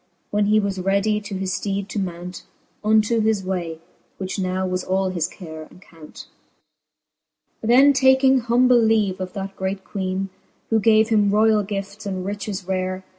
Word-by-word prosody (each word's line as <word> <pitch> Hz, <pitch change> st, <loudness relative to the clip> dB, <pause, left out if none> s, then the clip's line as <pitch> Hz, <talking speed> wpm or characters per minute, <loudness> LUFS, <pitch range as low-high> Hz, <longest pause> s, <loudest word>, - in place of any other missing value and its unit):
When 205 Hz, 0 st, +1 dB
he 215 Hz, +1 st, +4 dB
was 200 Hz, -2 st, -2 dB
readie 200 Hz, +3 st, +1 dB
to 205 Hz, -1 st, -7 dB
his 190 Hz, 0 st, -3 dB
fteede 200 Hz, -1 st, -3 dB
to 210 Hz, -, -3 dB
mount, 180 Hz, -1 st, -6 dB, 0.4 s
Unto 220 Hz, +1 st, +3 dB
his 215 Hz, -2 st, +1 dB
way, 175 Hz, -4 st, -3 dB, 0.4 s
which 190 Hz, 0 st, -4 dB
now 185 Hz, 0 st, -1 dB
was 185 Hz, 0 st, -2 dB
all 190 Hz, 0 st, 0 dB
his 175 Hz, -3 st, -1 dB
care 160 Hz, -4 st, -10 dB
and -, -, -17 dB
count. 165 Hz, -4 st, -13 dB, 1.4 s
XVII. 220 Hz, -, -4 dB
Then 270 Hz, +4 st, +6 dB
taking 265 Hz, 0 st, +4 dB
humble 245 Hz, +1 st, +3 dB
leave 215 Hz, -4 st, +1 dB
of 185 Hz, -1 st, -5 dB
that 195 Hz, 0 st, -6 dB
great 190 Hz, 0 st, -3 dB
Queene, 190 Hz, -1 st, -3 dB, 0.4 s
Who 225 Hz, -, +4 dB
gave 220 Hz, +1 st, +4 dB
him 210 Hz, -3 st, +3 dB
roiall 215 Hz, +1 st, +3 dB
gifts 200 Hz, +1 st, -5 dB
and 185 Hz, -2 st, -4 dB
riches 200 Hz, -1 st, -4 dB
rare. 185 Hz, 0 st, -2 dB
195 Hz, 170 wpm, -22 LUFS, 185-215 Hz, 1.4 s, Then